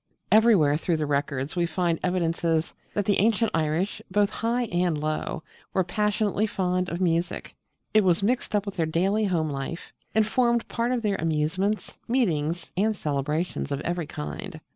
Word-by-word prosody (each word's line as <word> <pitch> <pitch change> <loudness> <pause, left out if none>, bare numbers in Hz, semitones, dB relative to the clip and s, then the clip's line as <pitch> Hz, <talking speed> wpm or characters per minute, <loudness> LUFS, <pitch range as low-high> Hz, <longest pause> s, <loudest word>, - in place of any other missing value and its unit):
Everywhere 205 -10 +5
through 170 0 0
the 155 - -1
Records 140 0 -1
we 175 -1 +1
find 170 0 0
evidences 165 -2 0 0.2
that 205 - 0
the 205 - +2
ancient 225 +2 +3
Irish, 160 +4 0
both 205 +1 +2
high 240 +2 0
and 175 -2 +1
low, 155 +1 -2 0.3
were 190 - +3
passionately 210 +3 0
fond 180 -2 0
of 170 - -3
music. 170 -1 -1 0.4
It 215 -1 +5
was 180 0 +2
mixed 235 0 0
up 205 0 +1
with 200 -1 -6
their 165 -2 +1
daily 195 +7 +1
home 165 -5 0
life, 140 +5 -5 0.2
and 220 -1 +4
formed 235 +1 +2
part 235 +1 -1
of 245 -2 0
their 205 -2 +1
amusements, 165 +6 -1
meetings, 175 - 0
and 210 +3 +1
celebrations 150 +2 -2
of 140 - -1
every 170 -1 -2
kind. 160 +4 -6
180 Hz, 165 wpm, -26 LUFS, 160-210 Hz, 0.4 s, Everywhere